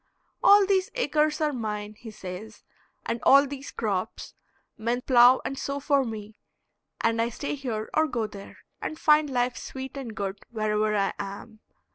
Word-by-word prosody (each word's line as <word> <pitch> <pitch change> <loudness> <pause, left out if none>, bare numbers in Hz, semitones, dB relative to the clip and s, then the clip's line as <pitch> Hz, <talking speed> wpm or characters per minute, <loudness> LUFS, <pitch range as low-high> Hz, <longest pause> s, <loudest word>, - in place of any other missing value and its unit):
All 405 0 +7
these 385 -1 +1
acres 310 -11 +1
are 300 -1 +1
mine, 210 -3 -4
he 225 +2 -11
says, 215 +1 -9 0.4
and 235 - -2
all 275 +1 +7
these 280 0 -7
crops; 205 -1 -3 0.4
men 235 +3 -1
plow 250 0 +6
and 270 - -3
sow 280 0 -3
for 280 -1 +2
me, 220 -2 -7 0.6
and 230 0 +2
I 230 - +1
stay 285 +6 -4
here 240 -6 -4
or 315 0 +3
go 235 -6 -2
there, 200 -2 -10 0.2
and 310 - -4
find 300 -1 +4
life 245 -1 0
sweet 265 +1 -7
and 250 -6 -6
good 195 -1 -4
wherever 215 -1 0
I 195 - +1
am. 200 +3 -7
235 Hz, 165 wpm, -26 LUFS, 215-280 Hz, 0.6 s, All